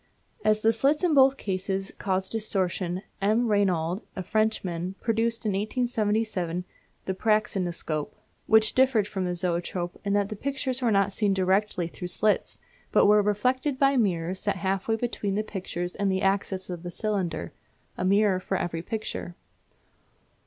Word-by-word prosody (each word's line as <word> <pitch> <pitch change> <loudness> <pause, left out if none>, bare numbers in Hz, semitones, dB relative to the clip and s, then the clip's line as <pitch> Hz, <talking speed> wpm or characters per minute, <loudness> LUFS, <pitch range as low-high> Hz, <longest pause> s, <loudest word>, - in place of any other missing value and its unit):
As 215 0 +3
the 225 +1 +4
slit 280 +8 +1
in 345 -3 +3
both 270 -1 +6
cases 195 -1 -3
caused 190 -1 -1
distortion 190 -4 -1 0.2
M. 220 +4 +2
Reynaud, 190 -3 +1
a 185 - -4
Frenchman, 190 -4 -1
produced 230 0 0
in - - +2
1877 210 -4 -1 0.4
the 190 - -1
praxinoscope, 185 -7 -1 0.3
which 220 0 +6
differed 255 -6 +3
from 190 -3 -3
the 180 0 -1
zoetrope 175 0 -2
in 200 -1 0
that 205 -1 +1
the 215 - -4
pictures 265 +2 -3
were 240 - +2
not 200 -1 +2
seen 205 -2 +1
directly 190 -1 +1
through 180 +1 -7
slits, 210 +3 +1 0.3
but - - +5
were 210 +1 +6
reflected 255 +7 +1
by 275 0 +3
mirrors 185 -6 0
set - - -1
half 190 0 -2
way 225 - +2
between 220 -4 -2
the 215 - 0
pictures 180 -4 -5
and 200 -1 0
the 190 0 -1
axis 190 -1 0
of 175 -2 -5
the 175 - -6
cylinder, 185 -4 -3 0.4
a - - -3
mirror 200 0 +3
for 190 +1 -2
every 165 -2 -3
picture. 195 -3 -5
200 Hz, 160 wpm, -27 LUFS, 185-220 Hz, 0.4 s, both